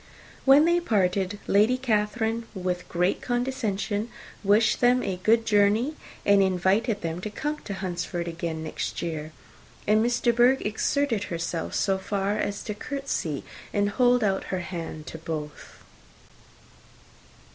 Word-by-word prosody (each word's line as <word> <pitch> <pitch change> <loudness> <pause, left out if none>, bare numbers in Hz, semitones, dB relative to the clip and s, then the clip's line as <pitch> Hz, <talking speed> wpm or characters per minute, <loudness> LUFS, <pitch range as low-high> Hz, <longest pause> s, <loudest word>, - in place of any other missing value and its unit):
When 280 +3 +7
they 345 +1 +4
parted, 200 - 0
Lady 215 +5 +4
Catherine, 225 -1 0
with 180 -1 -3
great 180 +2 +1
condescension, 235 -4 -1 0.3
wished 210 +2 +3
them 250 +1 +4
a 190 -2 -2
good 225 +3 +3
journey, 215 +6 +3 0.3
and 200 -1 +5
invited 195 +4 +1
them 165 +1 -3
to 215 - -4
come 295 +8 -3
to 200 - -6
Hunsford 175 -2 -3
again 165 -1 -4
next 155 - -4
year; 155 -2 -4 0.5
and 215 +1 +4
Miss 240 +1 +1
de 235 - +3
Bourgh 245 +3 +4
exerted 220 +1 0
herself 165 -1 -3
so 195 -1 +1
far 200 +1 -1
as 205 0 -2
to 210 - -4
courtesy 220 - -3 0.3
and 205 0 +1
hold 245 0 +3
out 195 -2 0
her 185 -1 -3
hand 165 -4 -6
to 160 - -8
both. 155 -2 -7
205 Hz, 140 wpm, -26 LUFS, 180-235 Hz, 0.5 s, When